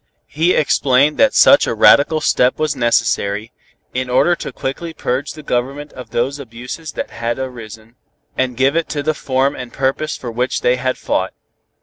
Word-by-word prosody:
He 165 +4 +1
explained 140 0 +2
that 275 -1 +4
such 280 - +6
a - - -1
radical 150 +7 +5
step 125 +1 +2
was 155 -1 -1
necessary, 110 -3 0 0.4
in 130 0 -2
order 135 +8 +3
to - - -7
quickly 160 +5 -5
purge 130 +4 -2
the 155 - -11
Government 140 +3 -3
of 125 - -10
those 135 +5 -1
abuses 125 +5 -8
that - - -5
had 115 +1 -3
arisen, 115 -3 -8 0.4
and 125 -2 -1
give 135 +2 +3
to 165 - +2 0.2
it - - -2
the 155 - +2
form 135 -1 0
and 125 -1 -8
purpose 135 +3 -1
for 120 - -6
which 125 +3 -1
they 125 +1 +2
had 130 0 -2
fought. - - -2
130 Hz, 180 wpm, -18 LUFS, 125-145 Hz, 0.4 s, such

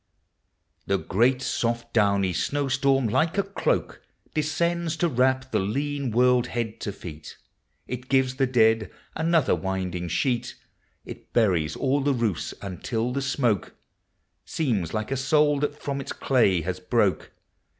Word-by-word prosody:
The 100 - +2
great 125 +8 +1
soft 120 -1 -2
downy 100 -4 +2
snow 145 - -1
storm 135 -1 +2
like 145 - +1
a 200 - +3
cloak 195 +1 -2 0.3
Descends 165 +2 0
to 175 - +2
wrap 130 -1 +1
the - - +2
lean 140 +7 -2
world 125 +1 +3
head 115 -3 -3
to 100 - -3
feet; 80 -6 -10 0.5
It 125 0 -6
gives 130 -1 +2
the 135 - +2
dead 110 -3 +3 0.3
another 160 -3 +2
winding 95 -2 -2
sheet, 120 - -1 0.5
It - - -11
buries 90 -10 +2
all 140 +1 +1
the 140 0 +1
roofs 110 -9 -1
until 110 +5 -3
the 140 - -1
smoke 125 - 0 0.7
Seems 110 - -1
like 110 +3 -3
a - - +1
soul 145 +2 +3
that 145 +1 -2
from 140 -1 -3
its - - -6
clay 105 -10 +2
has 90 +3 -4
broke. - - 0
125 Hz, 145 wpm, -25 LUFS, 105-140 Hz, 0.7 s, a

